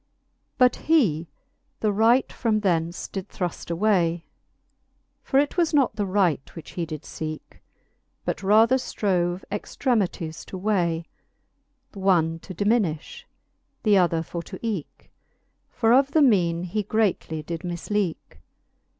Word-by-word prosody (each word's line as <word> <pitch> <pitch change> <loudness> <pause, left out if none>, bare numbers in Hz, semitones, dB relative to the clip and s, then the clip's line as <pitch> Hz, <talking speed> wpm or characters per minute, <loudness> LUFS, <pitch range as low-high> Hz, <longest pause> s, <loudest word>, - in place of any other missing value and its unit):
XLIX. - - -49
But 250 -1 +5
he 195 - +2 0.5
the 215 - +2
right 225 +5 +3
from 220 -3 0
thence 170 -3 0
did 195 -2 -6
thruft 180 -2 -4
away, 170 -2 +1 1.0
For 270 - 0
it 290 +4 0
was 335 -3 +2
not 270 -7 +3
the 205 -2 -1
right, 185 -8 0
which 165 -3 -9
he 170 -2 -3
did 155 -1 -6
feeke 155 -1 -6
j - - -22 0.7
But - - -2
rather 220 +6 +5
ftrove 180 -7 -1
extremities 200 - -2
to 190 - -7
way, 175 -5 0 0.9
Th'one 175 -5 +2
to 185 - -10
diminifh, 210 - 0 0.6
th'other 180 -6 +3
for 170 +1 -5
to - - -9
eeke; 205 -9 -5 0.6
For 225 0 +2
of 275 +2 +4
the 315 - +5
meane 175 -9 +3
he 185 +4 -2
greatly 200 -7 -1
did 165 +1 -5
mifleeke. 180 +1 -3
190 Hz, 135 wpm, -25 LUFS, 170-220 Hz, 1.0 s, But